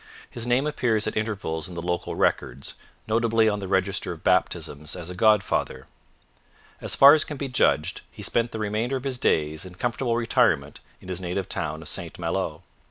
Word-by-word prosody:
His 120 0 -5
name 125 +3 +2
appears 120 -8 0
at 110 - -3
intervals 100 -7 -2
in 90 - -9
the - - -4
local 90 0 -2
records, 65 +2 0 0.3
notably 115 0 +3
on 105 -1 +1
the 95 - -5
register 95 0 0
of 85 0 -9
baptisms 80 -5 0
as 90 -1 -6
a - - -7
godfather. 100 -10 +2 1.0
As - - +1
far 140 +1 +9
as 155 - +3
can 150 - -7
be 140 - -3
judged, 90 - +1
he - - -10
spent 120 0 0
the - - -5
remainder 110 +4 -1
of 130 - -4
his 130 -3 -3
days 75 -4 +1
in 90 -1 -10
comfortable 120 +3 -1
retirement 75 - +1 0.2
in - - -13
his 90 0 -2
native 90 +1 -3
town - - -3
of - - -10
St - - -4
Malo. - - -2
105 Hz, 190 wpm, -25 LUFS, 90-120 Hz, 1.0 s, far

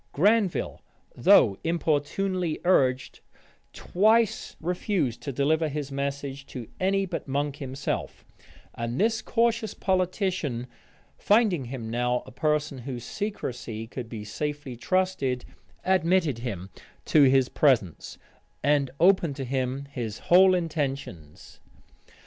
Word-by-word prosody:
Granville, 205 +3 +1 0.3
though 95 - +5
importunately 170 +2 0
urged, 130 -8 +2 0.5
twice 220 +4 +1
refused 175 - -1
to 140 - -4
deliver 155 +4 +1
his 145 -1 -4
message 140 0 -4
to 120 -4 -7
any 195 +1 +1
but 180 - -5
Monk 140 +1 -1
himself; 135 -1 -4 0.5
and 115 +1 -4
this 220 +1 +2
cautious 230 -2 0
politician, 185 - -1 0.5
finding 205 - +3
him 120 -3 -6
now 125 +1 0
a - - -12
person 150 +1 -1
whose 125 -1 -6
secrecy 125 - -5
could 120 0 -7
be 110 -3 -6
safely 145 +3 -4
trusted, 140 -2 0 0.4
admitted 180 -7 +2
him 100 -6 -5 0.3
to 155 - +4
his 130 -1 +4
presence, 120 - +1 0.5
and 140 -1 +2
opened 175 -5 +4
to 135 -1 -4
him 130 +1 -2
his 120 -6 -5 0.2
whole 185 +1 +7
intentions. 140 - -4
145 Hz, 115 wpm, -26 LUFS, 125-185 Hz, 0.5 s, whole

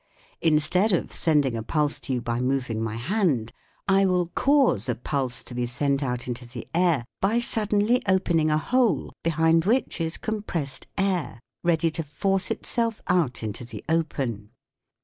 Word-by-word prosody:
Instead 170 +6 +3
of 175 - -1
sending 145 -6 +3
a 115 - -2
pulse 150 +5 0
to 135 - -3
you 125 - -1
by 120 0 -1
moving 125 -3 -1
my 110 -1 -2
hand, 135 - 0 0.4
I 195 0 +4
will 180 -2 +1
cause 270 - +3
a 120 - +1
pulse 125 -3 -3
to 125 - -6
be 120 0 -1
sent 140 +3 0
out 125 -3 -3
into 125 0 -5
the 120 -1 -8
air 170 -7 +2 0.2
by 205 +4 +2
suddenly 220 0 +2
open 185 -2 +2
^ - - +4
ing 155 - +2
a 155 - +3
hole 235 - +1
behind 165 0 +2
which 230 -4 +1
is 160 0 -2
com 220 -1 -3
pressed 150 -9 -5
air 185 - -1 0.2
ready 165 -1 +2
to 165 - -2
force 190 +6 0
itself 230 -2 -1
out 165 -11 +1
into 110 +2 -4
the 120 - -9
open. 135 -10 -1
155 Hz, 175 wpm, -25 LUFS, 125-190 Hz, 0.4 s, I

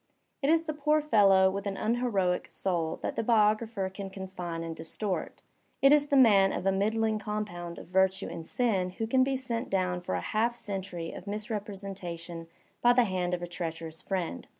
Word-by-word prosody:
It 275 - +1
is 325 0 +4
the 310 -1 -3
poor 300 +1 +2
fellow 195 -9 +5
with 200 +1 -4
an 195 -1 -3
un 230 +2 0
heroic 195 -8 0
soul 170 -4 -1
that - - -2
the - - 0
biographer 215 -2 +2
can 195 +1 -7
confine 185 -3 -6
and 165 -1 -5
distort. 165 +2 -4 0.4
It 275 - +6
is 295 -1 +5
the 280 - +3
man 200 -6 +6
of - - -3
a 195 - +4
middling 215 +2 +1
compound 200 -5 -4
of - - -9
virtue 190 +1 +2
and 165 -1 -7
sin 200 -7 +1
who 225 - -1
can 260 +3 +3
be 270 0 0
sent 240 -3 -3
down 180 -2 0
for 175 - -3
a - - -1
half 230 +2 0
century 190 -6 -5
of 185 - -10
misrepresentation 195 -5 -5 0.3
by 240 0 +6
the 245 0 +5
hand 180 -4 -1
of 175 - -7
a - - -3
treacherous 165 -2 -5
friend. 185 - -3
195 Hz, 195 wpm, -29 LUFS, 180-225 Hz, 0.4 s, It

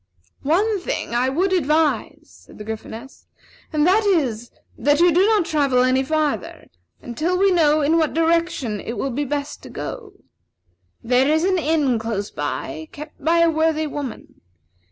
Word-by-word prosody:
"One 395 +9 +1
thing 355 - -4
I 250 +2 +1
would 365 +8 0
strongly 375 - +3
advise," 305 +1 0 0.2
said - - -16
the 210 - -8
Gryphoness, 220 +4 -8 0.4
"and 305 -2 +2
that 395 +5 +4
is, 260 - 0 0.3
that 290 +1 +2
you 350 0 +5
do 355 +4 +4
not 430 -5 +3
travel 275 -6 +2
any 255 +1 +2
farther 295 - -2 0.3
until 310 +10 -1
we 390 +1 +3
know 310 -3 +3
in 320 +3 +3
what 315 -2 0
direction 330 -9 0
it 230 - -5
will 270 - -2
be 285 +4 -2
best 285 +1 -4
to - - -11
go. 430 -5 -7 0.9
There 250 +3 +2
is 315 +1 +2
an 370 -1 +2
inn 295 -6 +1
close 215 -2 -4
by, 145 +1 -5
kept 300 -1 -11
by 335 +2 +3
a 335 0 +4
worthy 315 0 +1
woman. 285 -4 -7
300 Hz, 170 wpm, -21 LUFS, 255-335 Hz, 0.9 s, you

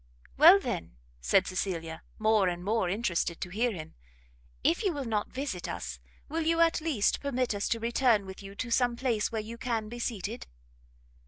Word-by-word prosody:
"Well, 340 +7 +9
then," 85 - -4 0.2
said 185 - +3
Cecilia, 165 -4 -3 0.2
more 215 -3 +3
and 175 0 -2
more 210 -2 +1
interested 180 -4 -1
to 180 - -4
hear 235 +5 +1
him, 160 -6 -8 0.7
"if 170 - +2
you 380 - +1
will 285 -3 -4
not 215 -3 -1
visit 260 -10 -4
us, - - -5 0.3
will 325 +3 -2
you 330 +1 +1
at 335 -1 +4
least 295 -11 +1
permit 255 -4 0
us 200 0 -2
to 230 - 0
return 235 -2 +2
with 190 +1 -9
you 195 0 -10
to 235 +3 -4
some 245 0 +2
place 235 -4 0
where 220 -2 -2
you 230 +2 -8
can 225 -3 -2
be 240 +1 -7
seated?" 225 -1 -4
220 Hz, 185 wpm, -29 LUFS, 190-250 Hz, 0.7 s, Well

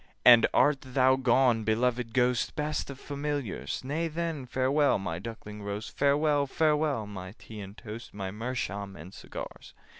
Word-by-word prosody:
'And 120 -2 +9
art 145 -1 +4
thou 130 0 +3
gone, 125 -3 +3
beloved 120 +2 0
Ghost? 125 0 +1
Best 150 -1 -2
of 140 -1 -8
Familiars! 145 -7 -3
Nay 155 +5 -1
then, 160 -4 -3
farewell, 135 +4 +2
my 90 -4 -4
duckling 105 0 -8
roast, 100 +2 -5
Farewell, 145 0 +3
farewell, 150 -5 +1
my 95 -2 -8
tea 110 -1 -10
and 100 +2 -10
toast, 110 +2 -8
My 95 -2 -5
meerschaum 100 -3 -4
and 85 +6 -11
cigars! - - -9
125 Hz, 150 wpm, -29 LUFS, 105-145 Hz, -, And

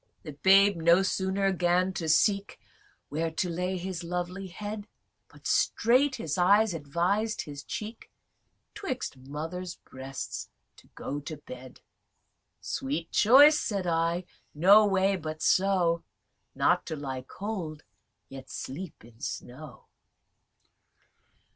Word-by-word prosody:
Tityrus. - - -43
The 155 - -7
babe 195 +1 +6
no 170 +3 +4
sooner 195 0 0
'gan 180 +1 +1
to 165 -3 -3
seek 200 +5 +2 0.5
Where 165 +3 -1
to 160 +3 -2
lay 180 +2 -2
his 180 -1 -5
lovely 180 +2 -4
head, 205 +3 -6 0.4
But - - -19
straight 260 +4 +3
his 165 - -3
eyes 205 +3 +4
advis'd 175 +9 -1
his 145 -2 -9
cheek, 225 -3 -7 0.6
'Twixt 260 - -4
mother's 160 +7 -6
breasts 130 +1 -7 0.3
to - - -19
go 145 - -4
to 155 +2 -7
bed. 130 -3 -11 0.8
Sweet 150 +5 -3
choice 285 +7 +7
(said 200 -4 -2
I) 170 +1 0 0.3
no 200 +7 +7
way 195 0 +2
but 155 -2 -6
so, 185 -3 +2 0.5
Not - - +2
to 160 - -3
lie 135 -3 -5
cold, 165 0 -6 0.4
yet 135 -1 -11
sleep 150 - -7
in 115 -1 -18
snow. 140 +1 -7
180 Hz, 120 wpm, -28 LUFS, 155-195 Hz, 0.8 s, choice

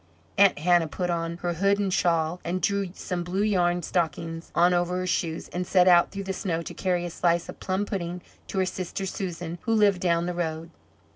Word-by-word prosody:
Aunt 200 -1 +5
Hannah 175 +1 +3
put 175 +4 -2
on 165 0 -2
her 175 -1 0
hood 195 +4 +2
and 200 -2 -1
shawl, 165 -1 +1
and 175 +2 -2
drew 200 0 0
some 180 -2 -3
blue 185 +4 -1
yarn 175 -4 +1
stockings 165 0 -2
on 175 +1 +5
over 175 +1 +1
her 185 - -2
shoes, 165 -2 -1
and 180 +1 -4
set 185 -1 +4
out 175 -1 +6
through 195 0 -5
the 190 0 -3
snow 170 -4 -2
to - - -7
carry 180 -2 -1
a 175 - -5
slice 170 0 +1
of - - -9
plum 190 +2 -1
pudding 180 -3 -4 0.2
to - - -5
her 190 - +3
sister 185 +1 -4
Susan, 175 -3 -5
who 225 - 0
lived 205 -4 +4
down 170 -2 +2
the 180 - -2
road. 165 -1 -3
175 Hz, 215 wpm, -26 LUFS, 170-190 Hz, 0.2 s, out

